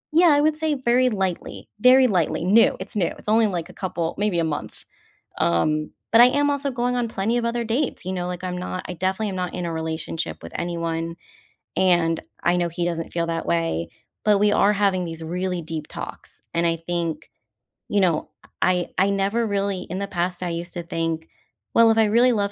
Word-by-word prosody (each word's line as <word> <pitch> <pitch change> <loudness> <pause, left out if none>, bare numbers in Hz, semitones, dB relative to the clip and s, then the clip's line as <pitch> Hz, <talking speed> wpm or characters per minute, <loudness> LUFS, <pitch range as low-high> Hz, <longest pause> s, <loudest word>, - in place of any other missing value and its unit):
Yeah. 345 +2 +6
I 290 0 +4
would 310 0 +2
say 310 -1 +2
very 255 -1 +2
lightly. 190 -5 -3
Very 255 +3 +7
lightly. 165 -5 0
New. 210 +5 +5
It's - - -4
new. 185 -5 +1
It's - - -10
only, 220 +1 +4
like, 175 -4 -3
a 180 - -12
couple 170 -3 -3
maybe 205 -3 0
a - - +2
month. 155 -2 -5 0.5
Um, 155 - +1 0.2
but 225 - +6
I - - +9
am 285 +3 +2
also 280 0 0
going 250 0 -1
on 240 -1 0
plenty 220 +2 -1
of 240 - 0
other 235 0 -1
dates, 240 +2 0
you 185 - -3
know, 180 -1 -3
like, 180 0 -5
I'm 180 -1 -3
not 180 0 -5
I - - -3
definitely 190 +5 -1
am 190 - -5
not 180 -1 -3
in 180 -1 -3
a 170 - -3
relationship 160 - -4
with 85 - -9
anyone, 170 -1 -3 0.6
and 175 -3 +3 0.2
I 175 +1 +3
know 175 -1 0
he 170 +1 -2
doesn't 165 -1 -3
feel 170 -1 0
that 165 0 -2
way, 85 -1 -1 0.4
but 210 -2 +4
we 205 0 +4
are 205 0 +4
having 195 -3 +1
these 165 -1 -5
really 180 +2 -2
deep 160 -2 -5
talks, - - -5
and 170 0 +1
I 165 - +2
think 165 -1 -3 0.6
you 205 - +1
know, 170 -5 +1 0.3
I 180 -1 +2
I 195 +2 +3
never 200 +4 0
really 200 -2 -1
In 180 +3 -3
the 200 - -3
past, 180 -1 -2
I 175 - -2
used 170 +1 -3
to 175 - -4
think, 165 -1 -3 0.4
"Well, 230 0 +6
if 225 - +3
I 220 - +5
really 235 +4 +4
love 200 -2 0
180 Hz, 215 wpm, -23 LUFS, 165-220 Hz, 0.6 s, I